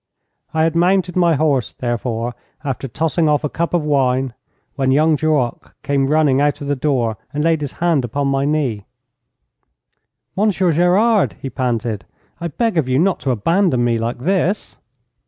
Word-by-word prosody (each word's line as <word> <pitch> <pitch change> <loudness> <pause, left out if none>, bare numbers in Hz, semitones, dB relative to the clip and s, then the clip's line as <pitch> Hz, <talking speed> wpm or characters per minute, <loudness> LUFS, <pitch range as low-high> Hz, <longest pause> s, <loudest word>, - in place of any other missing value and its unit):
I 160 0 +1
had 165 0 +1
mounted 180 +1 +2
my 170 -3 +3
horse, 140 -6 0
therefore, 120 -1 -3 0.3
after 135 -1 -3
tossing 160 +6 0
off 150 0 +1
a 150 - -1
cup 170 +3 -2
of 175 -3 +1
wine, 135 -3 +1 0.4
when 135 -1 0
young 155 +3 +4
Duroc 150 -5 -1
came 140 -1 +1
running 145 -2 +3
out 145 0 +1
of 145 - -6
the 145 - 0
door 125 -6 0
and 150 0 -2
laid 165 -1 +2
his 145 -2 -4
hand 165 -6 +1
upon 140 +4 -2
my 135 0 +1
knee. 140 -9 -1 1.5
'Monsieur 190 -3 +2
Gerard,' 190 +7 +3
he 135 - -6
panted, 115 -6 -2 0.3
'I 170 - -3
beg 220 - 0
of 130 -5 -1
you 130 - +2
not 180 +5 +2
to 135 - -3
abandon 130 - +2
me 120 -1 +1
like 115 +2 -2
this!' 185 - -1
145 Hz, 170 wpm, -19 LUFS, 130-165 Hz, 1.5 s, young